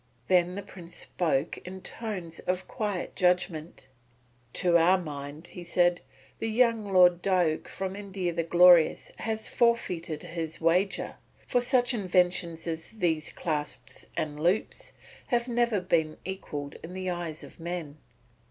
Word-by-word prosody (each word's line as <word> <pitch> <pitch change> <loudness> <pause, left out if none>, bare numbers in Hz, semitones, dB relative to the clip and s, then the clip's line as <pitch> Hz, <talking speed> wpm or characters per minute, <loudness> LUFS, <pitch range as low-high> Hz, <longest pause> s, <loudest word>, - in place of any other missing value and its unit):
Then 180 0 +3
the 200 - -5
Prince 175 -3 -11
spoke 160 -3 -1
in 185 +1 -9
tones 185 -9 -4
of 185 +1 -2
quiet 205 -4 -3
judgment: 180 -5 0 0.7
"To 175 -2 +2
our 170 +3 +6
mind," 150 -1 -7
he 180 - -9
said, 175 0 +2 0.4
"the 225 - -1
young 225 -3 +2
Lord 180 -2 +6
Diuk 180 -5 +1
from 190 0 -4
India 195 -3 -3
the 170 - 0
Glorious 175 0 +5
has 220 0 -2
forfeited 180 -10 0
his 165 -2 -5
wager; 180 +4 +1 0.3
for 245 - +2
such 245 0 +2
inventions 180 -4 +1
as 165 -1 -4
these 170 -8 -1
clasps 150 -3 -4
and 150 -1 -2
loops 175 +7 0 0.4
have 240 0 +1
never 240 -3 +2
been 160 -4 0
equalled 150 -7 -5
in 170 +2 -8
the 185 -1 -2
eyes 170 -3 -4
of - - -13
men." 165 -3 -5
180 Hz, 140 wpm, -28 LUFS, 165-195 Hz, 0.7 s, our